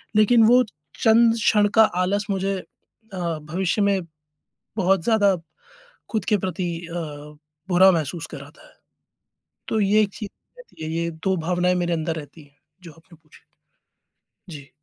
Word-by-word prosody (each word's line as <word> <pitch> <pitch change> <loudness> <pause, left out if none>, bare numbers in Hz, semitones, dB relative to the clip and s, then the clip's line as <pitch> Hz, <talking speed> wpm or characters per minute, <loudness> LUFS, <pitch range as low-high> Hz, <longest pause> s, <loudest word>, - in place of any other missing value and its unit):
लेकिन 220 +2 +5
वो 250 +2 +6 0.4
चंद 225 +1 +5
क्षण 210 -2 +3
का 220 - +8 0.2
आलस 200 +3 -1
मुझे 195 0 -1 0.6
अ, - - -6 0.2
भविष्य 175 +6 -1
में 200 -1 +2 0.8
बहुत 190 -3 +2
ज़्यादा 205 -3 +3 0.7
खुद 215 -4 -2
के 210 -3 +2
प्रति 185 -2 -3
अ, 165 - -10 0.8
बुरा 190 +1 +6
महसूस 165 -1 -2
कराता 145 +1 -12
है। - - -22 0.9
तो 220 - 0
ये 205 +2 +4
एक 205 - -2
चीज़ 210 -3 -6 0.3
रहती - - -13
है। 155 - -4
ये 170 +1 -1
2 190 -1 +1
भावनाएँ 180 0 +1
मेरे 175 -1 -1
अंदर 160 0 -2
रहती 150 +1 -10
हैं 145 0 -25 0.3
जो 170 - -10
आपने 165 +1 -20
पूछी। 155 - -21 1.1
जी। 140 -3 -10
185 Hz, 150 wpm, -23 LUFS, 165-210 Hz, 1.1 s, का